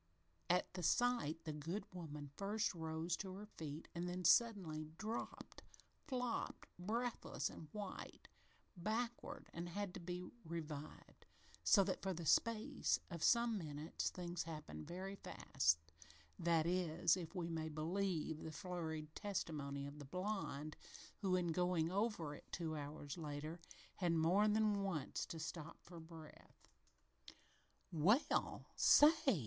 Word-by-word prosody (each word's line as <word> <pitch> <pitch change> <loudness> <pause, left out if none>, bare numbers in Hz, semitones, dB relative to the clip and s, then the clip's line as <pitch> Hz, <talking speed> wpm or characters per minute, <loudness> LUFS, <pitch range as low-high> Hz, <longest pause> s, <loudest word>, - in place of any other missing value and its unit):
At 180 +1 +3
the 180 - -4
sight 175 - +2
the 155 - -3
good 165 +7 -3
woman 150 -5 -6
first 205 +2 0
rose 160 0 -1
to 190 -2 -5
her 205 +2 -7
feet, 155 -6 -6
and 175 +1 -2
then 180 +1 -2
as 170 - +6
suddenly 180 -8 +4
dropped 220 +2 -4 0.5
flopped 250 -4 -2
breathless 230 +6 -1
and 155 - -9
white 205 -3 -6 0.5
backward 225 +6 -2
and 170 +1 -4
had 200 +1 -2
to 195 - -5
be 180 +1 -4 0.2
revived, 155 -3 -6 0.4
so 200 - +7
that 190 0 -1
for 190 -1 -1
the 170 0 -4
space 230 - +3
of 170 -2 -4
some 235 -2 +5
minutes 150 -1 -2
things 175 -1 -3
happened 155 -2 -6
very 190 +3 -4
fast 80 - +2 0.6
that 165 -2 +3
is, 170 -2 +3
if 180 0 -6
we 175 -2 -1
may 160 -1 -2
believe 160 0 -1
the 160 - -5
flurried 160 -3 -4
testimony 150 -8 -2
of 140 +1 -7
the 145 - -7
blonde, 160 -3 -2 0.4
who, 190 -3 +2
in 175 -2 +2
going 180 -1 +2
over 200 -7 0
it, - - -12
two 160 -3 -2
hours 145 +1 -5
later, 155 +2 -4 0.4
had 175 -3 +2
more 170 +6 +5
than 210 -1 +3
once 175 -8 -1
to 165 - -5
stop 160 0 -5
for 170 -1 -10
breath. 160 -1 -12 1.2
"Well, 190 - +3
say!" 295 - +7
175 Hz, 140 wpm, -41 LUFS, 155-200 Hz, 1.2 s, so